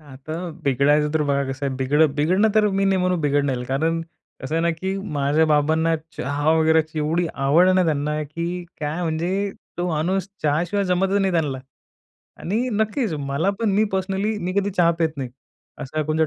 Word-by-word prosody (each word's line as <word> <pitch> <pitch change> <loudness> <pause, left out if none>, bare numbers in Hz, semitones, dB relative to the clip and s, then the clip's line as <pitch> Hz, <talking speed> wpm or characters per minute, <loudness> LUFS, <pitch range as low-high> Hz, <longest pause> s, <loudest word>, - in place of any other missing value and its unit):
आता 145 +1 -9 0.3
बिघडायचं 145 +3 +2
तर 155 -1 +1
बघा 140 -1 +1
कसं 140 +1 -3
आहे, 135 - -2
बिघडं 140 +2 +2
बिघडणं 185 +9 +3
तर 215 -1 +4
मी 195 0 0
नाही 195 -1 +3
म्हणू 180 0 +1
बिघडणार, 140 -3 0
कारण 160 +5 0 0.4
कसं 135 +4 -3
आहे 165 - +2
ना, 170 - +2
की 190 +4 -3 0.2
माझ्या 145 +2 +2
बाबांना 160 +2 +2 0.2
चहा 145 +3 0
वगैरे 160 0 +4
ची 155 0 -8
एवढी 165 +3 0
आवड 145 +6 +4
आहे 185 - +4
ना 185 -1 +3
त्यांना, 150 0 0
की 170 +4 -4 0.2
काय 155 +4 -2
म्हणजे 175 +5 -1 0.3
तो 175 - 0
माणूस 180 +4 -1
चहाशिवाय 170 +7 +1
जमतच 190 +2 +1
नाही 195 -1 +1
त्यांना. 150 -6 0 0.8
आणि 225 +8 -1
नक्कीच 220 - 0
मला 140 +6 0
पण 225 -3 +1
मी 215 +2 +4
पर्सनली 195 +3 -1
मी 180 0 -3
कधी 200 0 0
चहा 175 -3 +3
पीत 160 -2 0
नाही. 130 -3 -4 0.5
असं 135 +4 -8
काय 155 -1 0
कोणच्या 155 +1 +1
160 Hz, 190 wpm, -22 LUFS, 145-185 Hz, 0.8 s, तर